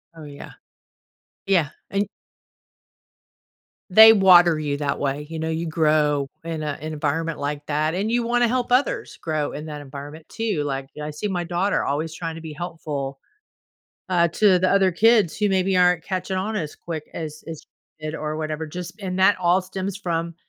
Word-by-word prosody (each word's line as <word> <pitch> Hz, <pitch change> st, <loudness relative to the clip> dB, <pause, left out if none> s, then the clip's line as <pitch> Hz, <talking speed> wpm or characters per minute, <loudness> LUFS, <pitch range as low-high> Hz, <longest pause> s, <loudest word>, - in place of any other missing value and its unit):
Oh, 160 Hz, -, -11 dB
yeah. 145 Hz, -1 st, -10 dB, 0.9 s
Yeah, 175 Hz, -7 st, +2 dB, 0.2 s
and 200 Hz, +1 st, 0 dB, 1.9 s
They 220 Hz, +3 st, +10 dB
water 175 Hz, -5 st, +6 dB
you 145 Hz, -2 st, -2 dB
that 145 Hz, -1 st, -2 dB
way. 145 Hz, +1 st, -2 dB
You 160 Hz, -1 st, -5 dB
know, 160 Hz, 0 st, -2 dB
you 165 Hz, +1 st, -2 dB
grow 150 Hz, -3 st, +2 dB
in 165 Hz, -2 st, -4 dB
a 150 Hz, -2 st, -3 dB
environment 155 Hz, +1 st, -2 dB
like 145 Hz, 0 st, -3 dB
that, 155 Hz, +2 st, 0 dB
and 210 Hz, +4 st, -1 dB
you 240 Hz, 0 st, +2 dB
wanna 240 Hz, 0 st, +2 dB
help 245 Hz, +1 st, -1 dB
others 255 Hz, +3 st, +1 dB
grow 155 Hz, -2 st, -2 dB
in 150 Hz, +2 st, -7 dB
that 150 Hz, -1 st, -7 dB
environment 145 Hz, +3 st, -10 dB
too, 210 Hz, -10 st, -2 dB
like, 135 Hz, -1 st, -4 dB
I 150 Hz, -, -4 dB
see 150 Hz, +8 st, -4 dB
my 180 Hz, -3 st, -2 dB
daughter 180 Hz, +4 st, 0 dB
always 155 Hz, +3 st, -2 dB
trying 165 Hz, -1 st, -5 dB
to 165 Hz, -, -8 dB
be 160 Hz, -2 st, -7 dB
helpful, 145 Hz, -5 st, -5 dB, 0.9 s
uh, 170 Hz, -2 st, +3 dB
to 185 Hz, +1 st, +4 dB
the 185 Hz, -, +2 dB
other 195 Hz, -2 st, +3 dB
kids 215 Hz, -1 st, +4 dB
who 210 Hz, -1 st, +1 dB
maybe 190 Hz, 0 st, +1 dB
aren't 180 Hz, -2 st, +3 dB
catching 185 Hz, 0 st, -3 dB
on 215 Hz, +3 st, -2 dB
as 155 Hz, -7 st, -4 dB
quick 160 Hz, -3 st, -7 dB
as 155 Hz, -2 st, -6 dB
as 160 Hz, -2 st, -7 dB, 0.4 s
she 155 Hz, -, -8 dB
did 155 Hz, +1 st, -3 dB
or 155 Hz, 0 st, -4 dB
whatever, 155 Hz, 0 st, -4 dB
just 180 Hz, +6 st, -8 dB
and 185 Hz, -1 st, -3 dB
that 190 Hz, +1 st, +4 dB
all 180 Hz, +1 st, +3 dB
stems 190 Hz, +1 st, -5 dB
from 170 Hz, -3 st, -2 dB
165 Hz, 180 wpm, -23 LUFS, 150-190 Hz, 1.9 s, They